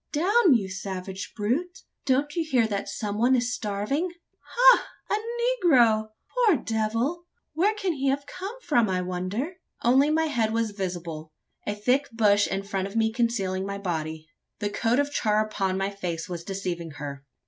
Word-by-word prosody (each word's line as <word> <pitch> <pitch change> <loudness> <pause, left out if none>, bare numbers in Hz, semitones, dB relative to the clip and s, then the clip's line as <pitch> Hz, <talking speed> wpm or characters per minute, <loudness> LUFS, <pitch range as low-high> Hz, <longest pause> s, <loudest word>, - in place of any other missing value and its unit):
"Down, 355 - +4
you 205 -5 0
savage 190 0 -5
brute! 290 - -2 0.2
Don't 280 +2 +1
you 335 - +1
hear 260 -7 +2
that 205 -2 -3
some 210 -2 -3
one 250 +3 +4
is 245 0 0
starving? 215 - -1 0.3
Ha! - - +5 0.2
a - - +3 0.5
negro! 225 -7 +5 0.3
Poor 475 -7 +4
devil! 230 +10 -1 0.3
where 400 +7 +2
can 390 -4 -1
he 275 -2 -2
have 280 +1 0
come 385 - -7
from, 240 - +2
I 185 -1 0
wonder?" 185 - -3 0.3
Only 265 +5 +5
my 320 +1 +2
head 235 -8 0
was 225 -1 0
visible 175 -5 -5 0.4
a 205 - -1
thick 255 +7 +1
bush 205 -3 +3
in 195 0 -2
front 195 -1 -2
of 200 - -11
me 220 -1 +2
concealing 210 -6 0
my 200 0 -4
body. 160 -4 -4 0.3
The 205 -1 -2
coat 225 +3 +1
of 285 0 +1
char 215 -5 +2
upon 195 -3 -1
my 195 +1 -1
face 175 -4 -4
was 175 -2 -5
deceiving 175 -4 -4
her. 140 -1 -6
220 Hz, 170 wpm, -26 LUFS, 195-280 Hz, 0.5 s, Ha